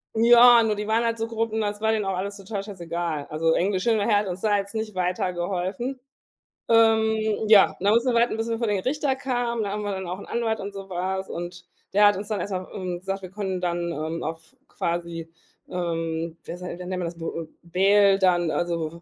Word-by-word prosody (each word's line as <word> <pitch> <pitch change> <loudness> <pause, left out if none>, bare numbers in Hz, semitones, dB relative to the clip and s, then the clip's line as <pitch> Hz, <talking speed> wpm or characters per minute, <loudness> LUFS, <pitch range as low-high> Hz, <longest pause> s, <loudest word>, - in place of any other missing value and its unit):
Ja, 235 +1 +7
nur 215 -1 +1
die 210 +1 -4
waren 225 +2 +2
halt 230 0 0
so 225 0 -2
grob, 225 -1 -2
ne, 220 - 0
das 205 0 -2
war 220 0 +2
denen 215 -2 0
auch 190 -1 -1
alles 200 +2 -4
total 195 0 -5
scheißegal. 170 -6 -4
Also, 160 +1 +1
Englisch, 185 +1 0
hin 230 -2 +3
oder 205 -1 +1
her, 210 -3 +4
hat 205 -1 0
uns 180 +1 -5
da 210 -2 +2
jetzt 200 +1 -4
nicht 220 -2 -3
weiter 180 0 -1
geholfen. 190 +9 -3 0.7
Ähm, 220 -1 +3
ja, 210 -3 +6
dann 205 +2 +3
mussten 235 +2 +3
wir 235 - +1
warten, 235 -1 +2
bis 225 +1 -2
wir 230 - -1
vor 230 -1 -1
den 205 -2 +1
Richter 275 +1 0
kamen. 245 -4 -1
Da 200 - -2
haben 210 0 -3
wir 205 - -2
dann 190 -2 -4
auch 180 +2 -4
'n - - -9
Anwalt 225 -2 -1
und 200 +1 -6
so 195 -1 -8
was 190 +2 -3
und 175 +1 -6 0.3
der 205 +1 +6
hat 205 - +3
uns 205 +1 -6
dann 210 -3 -1
erst 200 +2 -4
mal, 185 0 -3
ähm, 180 -3 -4
gesagt, 195 +1 -4
wir 185 - -8
können 190 -3 -3
dann, 170 -1 -1
ähm, 160 +2 -4
auf 160 +1 -7
quasi, 170 -1 -3 0.4
ähm, 165 -1 -3
wer 175 - -6
sa 180 - -7
wie 175 - -5
nennt 180 0 -7
man 185 -1 -2
das, 170 0 -5
w 165 - -6
äh, 165 -1 -5 0.2
bail 195 +3 +4
dann, 175 -3 +3
also, 170 -1 -2
195 Hz, 240 wpm, -25 LUFS, 175-220 Hz, 0.7 s, Ja